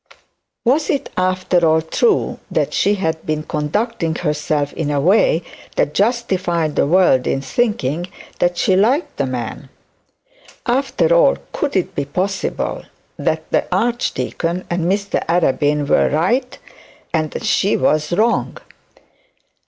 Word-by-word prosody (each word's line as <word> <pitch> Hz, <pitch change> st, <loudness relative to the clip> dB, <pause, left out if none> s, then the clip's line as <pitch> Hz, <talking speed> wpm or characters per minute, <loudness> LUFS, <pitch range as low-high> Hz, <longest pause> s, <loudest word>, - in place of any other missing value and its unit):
Was 285 Hz, +6 st, +2 dB
it 280 Hz, -, -1 dB
after 185 Hz, -1 st, +1 dB
all 160 Hz, 0 st, +3 dB
true 420 Hz, -, +1 dB
that -, -, -1 dB
she 205 Hz, -, +2 dB
had 160 Hz, -4 st, -2 dB
been 155 Hz, 0 st, -2 dB
conducting 165 Hz, +3 st, -2 dB
herself 150 Hz, -1 st, -1 dB
in 155 Hz, -3 st, -3 dB
a 145 Hz, -1 st, +1 dB
way 175 Hz, +1 st, +3 dB, 0.3 s
that 145 Hz, -, +1 dB
justified 190 Hz, -, 0 dB
the -, -, +2 dB
world 165 Hz, -7 st, +3 dB
in -, -, 0 dB
thinking 175 Hz, -, -1 dB, 0.3 s
that 175 Hz, 0 st, +1 dB
she 190 Hz, -, +2 dB
liked 270 Hz, -, +1 dB
the 140 Hz, -, 0 dB
man? 125 Hz, +1 st, -5 dB, 1.0 s
After 270 Hz, -, +1 dB
all, -, -, +4 dB, 0.2 s
could 290 Hz, -, -2 dB
it 185 Hz, -, 0 dB
be 140 Hz, -, -2 dB
possible 190 Hz, +7 st, -2 dB, 0.3 s
that -, -, -1 dB
the -, -, +1 dB
archdeacon 185 Hz, -7 st, -1 dB
and 175 Hz, -1 st, 0 dB
Mr 200 Hz, 0 st, -1 dB
Arabin 150 Hz, -3 st, +1 dB
were -, -, +3 dB
right, 235 Hz, -, 0 dB, 0.6 s
and 155 Hz, -2 st, 0 dB
that -, -, -6 dB
she 205 Hz, -1 st, +2 dB
was 150 Hz, +1 st, +1 dB
wrong? 220 Hz, +7 st, +1 dB
175 Hz, 135 wpm, -19 LUFS, 150-215 Hz, 1.0 s, all